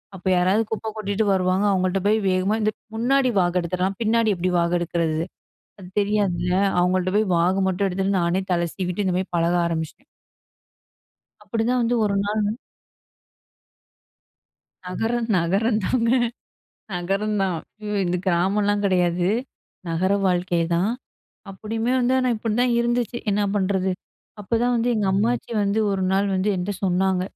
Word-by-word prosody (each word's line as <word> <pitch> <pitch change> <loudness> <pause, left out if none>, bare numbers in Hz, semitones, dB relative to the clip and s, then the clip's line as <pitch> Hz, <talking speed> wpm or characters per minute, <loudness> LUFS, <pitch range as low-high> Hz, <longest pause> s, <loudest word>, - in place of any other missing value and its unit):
அப்போ 185 0 -7
யாராவது 190 +5 +3
குப்ப 220 0 -3
கொட்டிட்டு 210 0 -1
வருவாங்க. 185 +1 +1
அவுங்கள்ட்ட 185 0 0
போய் 215 +1 +3
வேகமா 185 +3 +1
இந்த 215 - +2 0.2
முன்னாடி 255 +3 +2
வாகெடுத்துடலாம், 180 +2 -1
பின்னாடி 225 0 +2
எப்படி 180 +1 -1
வாகெடுக்கிறது? 170 -2 0 0.6
அது 180 - -10
தெரியாதுல, 200 -4 0 0.3
அவுங்கள்ட்ட 185 +1 +1
போய் 215 -1 +2
வாகு 180 +3 +2
மட்டும் 190 +2 0
எடுத்துட்டு, 195 +1 0
நானே 175 +3 +1
தல 170 -1 +1
சீவிட்டு, 185 +1 -2
இந்த 180 -1 +1
மாரி 190 - -3
பழக 170 +1 +2
ஆரம்பிச்சிட்டேன். 165 - -4 1.4
அப்படி 225 -2 -2
தான் 250 0 +2
வந்து 235 +1 +1
1 200 -1 0
நாள் 210 +1 0 2.4
நகரம் 225 +5 -1
நகரம் 195 +6 +1
தாங்க! 230 +3 +1 0.9
நகரம் 195 +4 -1
தான். 185 -3 0 0.5
இது 180 0 0
கிராமம்லாம் 200 +4 +1
கெடையாது. 180 -2 +1 0.6
நகர 180 +4 +1
வாழ்க்கைதான். 175 +1 +1 0.6
அப்படியுமே 225 +4 -3
வந்து, 245 +1 +2
ஆனா 255 -1 +1
இப்படி 215 0 -2
தான் 245 0 +2
இருந்துச்சு. 240 0 0
என்னா 205 +1 +1
பண்ணுறது? 190 -1 0 0.5
அப்பதான் 235 +4 0
வந்து 235 +1 0
எங்க 210 -3 0
அம்மாச்சி 230 +6 0
வந்து 200 +2 0
1 195 -1 -1
நாள் 200 +1 +2
வந்து 190 +2 0
என்ட்ட 180 +2 -2
சொன்னாங்க, 185 0 +1
195 Hz, 135 wpm, -23 LUFS, 180-215 Hz, 2.4 s, யாராவது